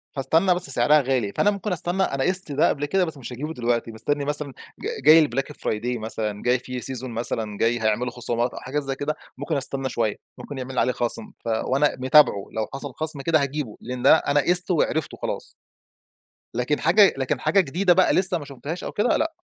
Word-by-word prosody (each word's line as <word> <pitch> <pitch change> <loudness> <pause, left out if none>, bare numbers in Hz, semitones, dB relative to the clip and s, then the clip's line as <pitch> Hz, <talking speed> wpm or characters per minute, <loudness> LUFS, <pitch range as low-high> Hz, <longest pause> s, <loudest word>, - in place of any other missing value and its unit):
فاستنى 165 +7 +2
بس، 175 -5 -3
سعرها 135 +4 +4
غالي، 125 -6 -1
فأنا 205 - +3
ممكن 205 0 -4
أستنى، 180 +2 -1
أنا 135 -6 -1
قِست 185 -2 +1
ده 145 +2 +3
قبل 145 0 -1
كده، 185 +5 +1
بس 160 -3 -7
مش 130 -2 -8
هاجيبه 150 +6 -5
دلوقتي. 120 -3 -1
بستنّي 140 +6 -2
مثلًا 145 0 -2 0.3
ج - - -5 0.2
جاي 155 0 +8
الBlack 135 +2 -3
Friday 120 +3 -2
مثلًا 110 -1 -4
جاي 125 +1 +2
في 125 0 -6
Season 130 0 -5
مثلًا 115 -3 -4
جاي 115 +2 +1
هيعملوا 110 +3 0
خصومات 120 0 -2
أو - - -7
حاجة 135 +3 -3
زي 135 -2 -3
كده، 145 +2 -2 0.2
ممكن 145 +3 -3
أستنى 135 0 -2
شوية 110 -4 -1 0.2
ممكن 145 - -8
يعمل 130 0 -3
عليه 125 - +2
خصم، 120 -2 -1
ف - - -5
وأنا 130 +6 +1
متابعه 130 -6 +4
لو 110 -1 -2
حصل 135 0 -6
خصم 155 -1 -3
كده 155 +1 +2
هاجيبه 140 -5 -3
لأن 125 0 -6
ده - - +7
أنا 145 -2 +1
قيسته 180 +4 +1
وعرفته 155 0 -1
خلاص. - - -4 1.1
لكن 125 +5 0
حاجة، 190 +5 +5
لكن 135 +1 -1
حاجة 155 +8 +2
جديدة، 180 +3 +3
بقى، 185 +1 +3
لسه 185 -1 +2
ما 145 - -8
شفتهاش 140 +5 -7
أو - - -4
كده 210 +4 +1
لأ. 325 +1 -1
135 Hz, 205 wpm, -24 LUFS, 120-155 Hz, 1.1 s, جاي